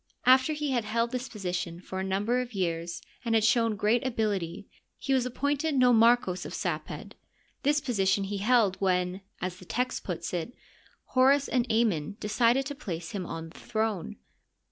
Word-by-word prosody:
After 260 Hz, +4 st, +5 dB
he 300 Hz, -2 st, -2 dB
had 240 Hz, -3 st, +1 dB
held 230 Hz, +2 st, 0 dB
this 255 Hz, 0 st, -3 dB
position 180 Hz, -5 st, -4 dB
for 190 Hz, +1 st, -6 dB
a -, -, -1 dB
number 205 Hz, +6 st, 0 dB
of 245 Hz, -3 st, -7 dB
years 170 Hz, -2 st, -2 dB, 0.2 s
and 230 Hz, -2 st, +1 dB
had 220 Hz, -, +3 dB
shown 225 Hz, 0 st, +3 dB
great 215 Hz, +4 st, +2 dB
ability, 205 Hz, -7 st, -2 dB, 0.3 s
he 270 Hz, -, -1 dB
was 255 Hz, -2 st, +2 dB
appointed 285 Hz, +4 st, -1 dB
nomarchos 235 Hz, -6 st, +4 dB
of -, -, -6 dB
Saped, -, -, -4 dB, 0.5 s
This 290 Hz, +1 st, +3 dB
position 200 Hz, -7 st, +1 dB
he 200 Hz, +1 st, -3 dB
held 215 Hz, -3 st, +3 dB
when, 180 Hz, 0 st, 0 dB, 0.2 s
as 185 Hz, 0 st, -3 dB
the 185 Hz, -, -13 dB
text 250 Hz, +7 st, -2 dB
puts 170 Hz, -2 st, -4 dB
it, 175 Hz, +7 st, -3 dB, 0.6 s
Horns 270 Hz, +2 st, +5 dB
and 245 Hz, -3 st, 0 dB
Amon 210 Hz, -5 st, +1 dB
decided 235 Hz, +5 st, +2 dB
to 285 Hz, -, -4 dB
place 175 Hz, -, -6 dB
him 190 Hz, -4 st, -4 dB
on 165 Hz, 0 st, -6 dB
the -, -, -14 dB
throne. 220 Hz, -5 st, -2 dB
220 Hz, 170 wpm, -28 LUFS, 185-250 Hz, 0.6 s, After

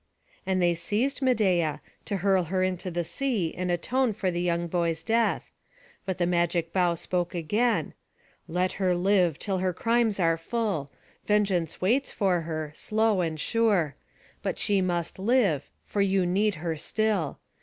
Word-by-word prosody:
And 190 Hz, -1 st, +1 dB
they 175 Hz, -1 st, +3 dB
seized 215 Hz, +12 st, -1 dB
Medeia, 190 Hz, -, +2 dB, 0.3 s
to 200 Hz, -, -2 dB
hurl 190 Hz, -1 st, +2 dB
her 185 Hz, +3 st, 0 dB
into 185 Hz, 0 st, -2 dB
the 175 Hz, 0 st, -2 dB
sea 220 Hz, -, -1 dB
and 180 Hz, 0 st, -3 dB
atone 230 Hz, +8 st, +1 dB
for 195 Hz, -3 st, -1 dB
the 175 Hz, 0 st, -2 dB
young 170 Hz, -1 st, 0 dB
boy's 170 Hz, -1 st, -1 dB
death; 230 Hz, 0 st, +1 dB, 0.6 s
but 190 Hz, -, -1 dB
the 175 Hz, -, +1 dB
magic 170 Hz, -1 st, 0 dB
bough 180 Hz, -2 st, +2 dB
spoke 175 Hz, +1 st, -2 dB
again: 210 Hz, +9 st, 0 dB, 0.5 s
"Let 180 Hz, +2 st, 0 dB
her 180 Hz, -1 st, +3 dB
live 180 Hz, -3 st, +2 dB
till 195 Hz, -3 st, -2 dB
her 185 Hz, 0 st, 0 dB
crimes 230 Hz, 0 st, +1 dB
are 165 Hz, -2 st, +3 dB
full. 180 Hz, -, -2 dB, 0.4 s
Vengeance 195 Hz, -6 st, +1 dB
waits 245 Hz, +9 st, +2 dB
for 185 Hz, -4 st, +1 dB
her, 155 Hz, -2 st, -4 dB
slow 215 Hz, +3 st, +1 dB
and 160 Hz, -2 st, -2 dB
sure; 200 Hz, -, +1 dB, 0.5 s
but -, -, -2 dB
she 200 Hz, -2 st, +2 dB
must 175 Hz, -1 st, -2 dB
live, 200 Hz, -, +2 dB
for 205 Hz, -, -2 dB
you 195 Hz, -1 st, +2 dB
need 200 Hz, +3 st, +1 dB
her 165 Hz, 0 st, -3 dB
still. 200 Hz, -1 st, -1 dB
185 Hz, 160 wpm, -27 LUFS, 170-210 Hz, 0.6 s, they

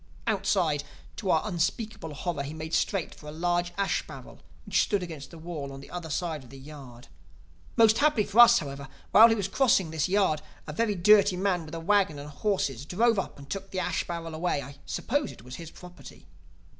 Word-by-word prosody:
"Outside, 185 Hz, -7 st, +1 dB, 0.3 s
to 200 Hz, -, -3 dB
our 160 Hz, +1 st, +2 dB
unspeakable 175 Hz, -2 st, -2 dB
horror, 170 Hz, 0 st, -3 dB
he 140 Hz, +2 st, -6 dB
made 160 Hz, +1 st, -7 dB
straight 195 Hz, -5 st, 0 dB
for 150 Hz, -, -14 dB
a -, -, -6 dB
large 175 Hz, +2 st, 0 dB
ash 200 Hz, 0 st, 0 dB
barrel -, -, -11 dB, 0.3 s
which -, -, +2 dB
stood 205 Hz, -4 st, 0 dB
against 160 Hz, -5 st, -8 dB
the 170 Hz, -, -12 dB
wall 160 Hz, -4 st, -6 dB
on 135 Hz, -, -9 dB
the 140 Hz, -, -13 dB
other 175 Hz, -2 st, -6 dB
side 160 Hz, -2 st, -3 dB
of 125 Hz, -, -16 dB
a 135 Hz, -, -11 dB
yard. 135 Hz, -3 st, -12 dB, 0.7 s
Most 225 Hz, -1 st, +5 dB
happily 290 Hz, -7 st, +3 dB
for 210 Hz, +3 st, 0 dB
us, 240 Hz, -, +9 dB
however, 140 Hz, -2 st, -5 dB, 0.2 s
while 225 Hz, +3 st, +9 dB
he 225 Hz, -, +3 dB
was 200 Hz, -3 st, -2 dB
crossing 195 Hz, -, +2 dB
this 160 Hz, +1 st, -1 dB
yard 185 Hz, -6 st, +2 dB, 0.2 s
a 150 Hz, -, -6 dB
very 215 Hz, +4 st, 0 dB
dirty 200 Hz, +1 st, +5 dB
man 180 Hz, -3 st, 0 dB
with 160 Hz, -, -7 dB
a -, -, -4 dB
wagon 190 Hz, -3 st, +2 dB
and 145 Hz, +1 st, -8 dB
horses 145 Hz, -, -1 dB
drove 225 Hz, +4 st, +2 dB
up -, -, -5 dB
and 140 Hz, -1 st, -12 dB
took 195 Hz, +4 st, -5 dB
the 185 Hz, -, -3 dB
ash 185 Hz, -, -1 dB
barrel 165 Hz, -1 st, -5 dB
away. 160 Hz, -3 st, -1 dB
I 140 Hz, +2 st, -11 dB
suppose 285 Hz, +3 st, -1 dB
it -, -, -14 dB
was 125 Hz, +1 st, -9 dB
his 165 Hz, -2 st, -8 dB
property. 180 Hz, +1 st, -13 dB
175 Hz, 210 wpm, -28 LUFS, 150-200 Hz, 0.7 s, us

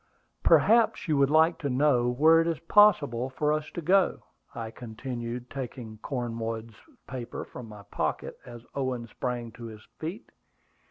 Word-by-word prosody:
"Perhaps 230 Hz, -3 st, +4 dB
you 155 Hz, -, +2 dB
would 140 Hz, -1 st, +4 dB
like 160 Hz, +2 st, +4 dB
to 140 Hz, -, -2 dB
know 130 Hz, -2 st, +3 dB
where 160 Hz, +6 st, +5 dB
it 165 Hz, -, -1 dB
is 165 Hz, -2 st, 0 dB
possible 150 Hz, -, +4 dB
for 150 Hz, +3 st, 0 dB
us 155 Hz, 0 st, -2 dB
to 170 Hz, -, -4 dB
go," 190 Hz, +3 st, +3 dB, 0.3 s
I 115 Hz, -1 st, -5 dB
continued, 120 Hz, +1 st, -6 dB
taking 120 Hz, -5 st, -7 dB
Cornwood's 115 Hz, -2 st, -4 dB, 0.3 s
paper 125 Hz, -2 st, -6 dB
from 120 Hz, -3 st, -10 dB
my 105 Hz, -1 st, -11 dB
pocket -, -, -3 dB
as 120 Hz, -1 st, -11 dB
Owen 130 Hz, -3 st, -2 dB
sprang 120 Hz, 0 st, -4 dB
to 115 Hz, +2 st, -10 dB
his 110 Hz, -1 st, -10 dB, 0.2 s
feet. 175 Hz, +10 st, -6 dB
125 Hz, 155 wpm, -28 LUFS, 115-155 Hz, 0.3 s, where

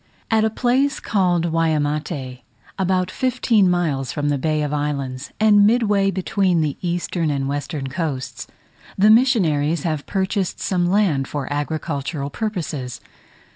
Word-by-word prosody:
At 220 Hz, -1 st, +3 dB
a 220 Hz, -, +3 dB
place 260 Hz, +5 st, +1 dB
called 175 Hz, -5 st, +1 dB
Waimate, 150 Hz, -4 st, -1 dB, 0.4 s
about 185 Hz, -1 st, +1 dB
fifteen 235 Hz, -6 st, +2 dB
miles 155 Hz, -7 st, 0 dB
from 145 Hz, -1 st, -1 dB
the 145 Hz, -1 st, 0 dB
Bay 155 Hz, +1 st, 0 dB
of 145 Hz, 0 st, -2 dB
Islands, 140 Hz, -3 st, -3 dB
and 205 Hz, -1 st, +6 dB
midway 210 Hz, -4 st, +2 dB
between 190 Hz, -2 st, +1 dB
the 150 Hz, -3 st, -1 dB
eastern 175 Hz, -2 st, -1 dB
and 140 Hz, -2 st, -1 dB
western 145 Hz, 0 st, -3 dB
coasts, 135 Hz, -3 st, -4 dB, 0.5 s
the 210 Hz, +2 st, +6 dB
missionaries 170 Hz, -, +3 dB
have 155 Hz, -4 st, -2 dB
purchased 190 Hz, -1 st, -1 dB
some 180 Hz, -2 st, 0 dB
land 175 Hz, -9 st, +2 dB
for 145 Hz, -2 st, -4 dB
agricultural 145 Hz, -1 st, -3 dB
purposes. 150 Hz, -, -4 dB
165 Hz, 135 wpm, -21 LUFS, 145-195 Hz, 0.5 s, and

